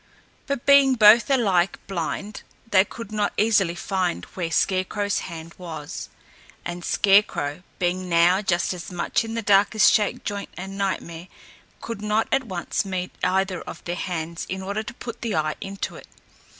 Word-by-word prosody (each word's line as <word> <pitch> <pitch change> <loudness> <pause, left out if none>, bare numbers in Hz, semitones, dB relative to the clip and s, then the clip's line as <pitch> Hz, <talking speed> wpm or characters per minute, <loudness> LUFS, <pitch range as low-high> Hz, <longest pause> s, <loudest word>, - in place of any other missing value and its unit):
But 280 -4 -3
being 280 -2 +6
both 225 +3 +7
alike 195 -9 +2
blind, 195 +3 -4 0.3
they 190 -1 +6
could 220 +1 -9
not 210 -1 0
easily 205 -5 +3
find 185 -1 -2
where 175 -3 -3
Scarecrow's 195 +4 0
hand 165 0 -8
was; 160 -5 -7 0.6
and 175 0 -5
Scarecrow, 195 -8 +2 0.2
being 180 +1 -1
now 175 +3 +4
just 180 -2 0
as 180 +2 -8
much 180 +5 0
in 225 0 -5
the 230 - -2
dark 200 +1 +4
as 215 - +6
Shakejoint 205 -1 -1
and 195 +1 -6
Nightmare, 180 -3 -3 0.5
could 230 -3 -6
not 210 +1 +1
at 270 -1 +2
once 185 -5 -2
meet 185 -2 -4
either 190 0 +1
of 170 - -9
their 175 - -3
hands 170 -2 -4
in 190 0 -4
order 200 +3 -2
to 265 +4 -8
put 235 -2 -8
the 225 -4 -2
eye 155 -1 0
into 195 0 -5
it. - - -13
195 Hz, 165 wpm, -24 LUFS, 175-210 Hz, 0.6 s, both